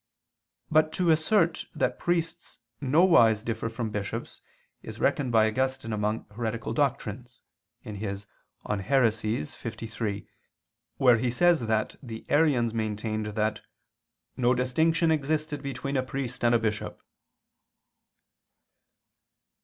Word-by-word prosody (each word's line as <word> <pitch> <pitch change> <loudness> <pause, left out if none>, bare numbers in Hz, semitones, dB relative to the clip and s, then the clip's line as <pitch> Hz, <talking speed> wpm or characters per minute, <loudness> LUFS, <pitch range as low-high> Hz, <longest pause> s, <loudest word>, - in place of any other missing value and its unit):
But 155 0 +4
to 175 -2 +2
assert 165 +1 +2
that - - 0
priests 170 -1 -2 0.2
nowise 130 - +5
differ 115 -1 -3
from 115 -1 -4
bishops 105 -1 -5 0.4
is - - -9
reckoned 135 -4 +1
by 110 -2 +5
Augustine 130 0 -1
among 105 +1 -1
heretical 115 0 -3
doctrines 125 -3 -2 0.4
(De 105 - -7
Heres. 100 -1 -5 0.4
liii), 110 - -1 0.7
where 125 -3 +5
he 125 - 0
says 175 +7 +4
that 110 -1 0
the 115 -5 -8
Arians 140 -7 +3
maintained 110 -1 -2
that 105 0 -1 0.7
"no 125 0 +2
distinction 160 +7 +2
existed 150 -1 -1
between 140 0 -4
a 130 - +3
priest 130 -1 -5
and 120 0 +4
a - - +4
bishop." 105 -2 -3
120 Hz, 110 wpm, -27 LUFS, 110-145 Hz, 0.7 s, nowise